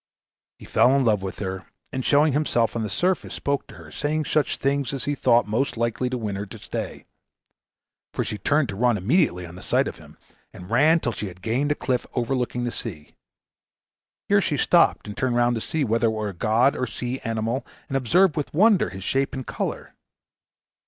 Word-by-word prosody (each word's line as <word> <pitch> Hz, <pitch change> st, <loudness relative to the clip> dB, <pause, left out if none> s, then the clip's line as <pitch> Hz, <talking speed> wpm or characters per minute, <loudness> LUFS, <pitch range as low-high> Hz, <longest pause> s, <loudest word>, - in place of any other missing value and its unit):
He -, -, -13 dB
fell 130 Hz, +2 st, +4 dB
in 135 Hz, -, +2 dB
love 105 Hz, -4 st, +3 dB
with 95 Hz, -1 st, -5 dB
her, 95 Hz, -1 st, -5 dB, 0.2 s
and 130 Hz, -, -3 dB
showing 145 Hz, +2 st, +4 dB
himself 120 Hz, -6 st, +1 dB
on 115 Hz, -, -1 dB
the 110 Hz, -, -2 dB
surface, 180 Hz, -, -1 dB
spoke 140 Hz, 0 st, -2 dB
to -, -, -13 dB
her, -, -, -13 dB
saying 150 Hz, +1 st, -1 dB
such 150 Hz, -3 st, +1 dB
things 140 Hz, -1 st, 0 dB
as 135 Hz, -, -3 dB
he 145 Hz, -, 0 dB
thought 120 Hz, -3 st, +3 dB
most 115 Hz, +4 st, -1 dB
likely 115 Hz, +2 st, 0 dB
to 130 Hz, -, -2 dB
win 105 Hz, -4 st, -3 dB
her 100 Hz, +1 st, -5 dB
to -, -, -10 dB
stay; -, -, -6 dB, 1.1 s
for -, -, -1 dB
she 105 Hz, -, -4 dB
turned 145 Hz, +7 st, +2 dB
to 100 Hz, -, -4 dB
run 120 Hz, +1 st, +2 dB
immediately 95 Hz, -, +1 dB
on 85 Hz, -, -10 dB
the 90 Hz, -, -10 dB
sight -, -, +1 dB
of -, -, -7 dB
him, -, -, -15 dB, 0.4 s
and 90 Hz, +3 st, -11 dB
ran 155 Hz, +8 st, +5 dB
till 120 Hz, -, -1 dB
she 105 Hz, -, -5 dB
had 90 Hz, 0 st, -12 dB
gained 130 Hz, +7 st, 0 dB
a -, -, +2 dB
cliff 125 Hz, -4 st, -1 dB
overlooking 125 Hz, 0 st, -1 dB
the 120 Hz, -, -1 dB
sea. 75 Hz, -13 st, -7 dB, 1.1 s
Here -, -, +4 dB
she -, -, -1 dB
stopped -, -, +3 dB
and 105 Hz, -, -7 dB
turned 130 Hz, -2 st, 0 dB
round 120 Hz, 0 st, +3 dB
to 115 Hz, -, -2 dB
see 160 Hz, +5 st, -1 dB
whether 115 Hz, -1 st, +2 dB
it -, -, +3 dB
was 110 Hz, -2 st, -2 dB
a -, -, -12 dB
god 110 Hz, +9 st, +2 dB
or 125 Hz, -, -1 dB
a -, -, -8 dB
sea 125 Hz, +2 st, -4 dB
animal, 115 Hz, +3 st, -2 dB, 0.2 s
and 135 Hz, -, -4 dB
observed 160 Hz, -, +3 dB
with 150 Hz, -, -3 dB
wonder 205 Hz, -, +4 dB
his 95 Hz, 0 st, -8 dB
shape 135 Hz, +6 st, 0 dB
and 130 Hz, -1 st, -5 dB
color. -, -, -4 dB
120 Hz, 215 wpm, -24 LUFS, 110-140 Hz, 1.1 s, ran